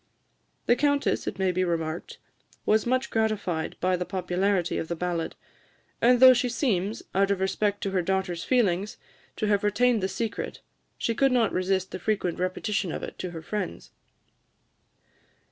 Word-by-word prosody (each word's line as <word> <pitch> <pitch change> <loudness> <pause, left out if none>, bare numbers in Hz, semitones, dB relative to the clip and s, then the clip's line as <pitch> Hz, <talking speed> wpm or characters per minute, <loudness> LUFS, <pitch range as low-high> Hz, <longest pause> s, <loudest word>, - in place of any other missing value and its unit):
The 240 - +4
Countess, 285 +2 +1
it - - -3
may 190 -1 +1
be 185 +1 0
remarked, 165 -2 -3 0.5
was 215 +2 +3
much 255 +2 0
gratified 205 -8 -1
by 185 +1 +2
the 180 - -2
popularity 185 0 0
of 160 - -4
the 170 - -2
ballad; 170 -1 -2 0.7
and 245 +1 +5
though 260 0 +10
she 250 0 0
seems, 215 -5 -1
out 195 +1 +3
of 200 -2 +1
respect 200 +1 0
to 195 - -1
her 190 -1 +1
daughter's 180 -1 -1
feelings, 205 -5 +1 0.4
to - - -2
have 205 -1 +2
retained 225 +2 +2
the 190 - +1
secret, 225 +3 -4 0.4
she 230 - 0
could 270 +4 +3
not 235 -4 +2
resist 185 0 0
the 185 - -5
frequent 185 -4 -1
repetition 185 +1 -1
of - - -5
it - - -7
to 185 - -3
her 165 -2 -8
friends. 195 - -5
195 Hz, 165 wpm, -27 LUFS, 180-225 Hz, 0.7 s, though